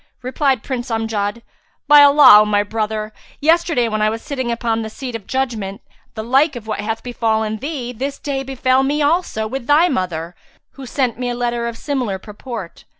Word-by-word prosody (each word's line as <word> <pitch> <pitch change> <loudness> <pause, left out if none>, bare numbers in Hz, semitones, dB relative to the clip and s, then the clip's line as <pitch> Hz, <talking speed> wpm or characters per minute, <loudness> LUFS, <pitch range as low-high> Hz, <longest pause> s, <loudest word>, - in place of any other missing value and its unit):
Replied 260 -1 0
Prince 250 -3 -4
Amjad, 225 -1 -2 0.4
"By 295 0 +8
Allah, 285 -7 +8
O - - +2
my 205 -1 +2
brother, 215 0 -3 0.3
yesterday 320 -5 +2
when 215 -1 -2
I 215 - +3
was 225 +1 -5
sitting 260 -4 -3
upon 230 -1 -1
the 220 - -5
seat 250 +1 -7
of 215 -4 -8
judgement, 230 -6 -3 0.3
the 220 - -4
like 270 +5 +2
of 235 -3 -8
what 215 -1 -4
hath 220 +2 -3
befallen 220 -3 -1
thee 260 -2 -5
this 270 +4 -4
day 275 -2 -3
befel 265 -1 +1
me 290 +2 0
also 295 -8 0
with 240 +2 -5
thy 315 +5 +4
mother 175 - -3 0.4
who 270 -2 -10
sent 250 -3 -1
me 250 -1 -2
a 245 - -2
letter 240 -1 -2
of 235 -1 -6
similar 255 -9 -2
purport." 210 -1 -9
240 Hz, 190 wpm, -19 LUFS, 220-270 Hz, 0.4 s, By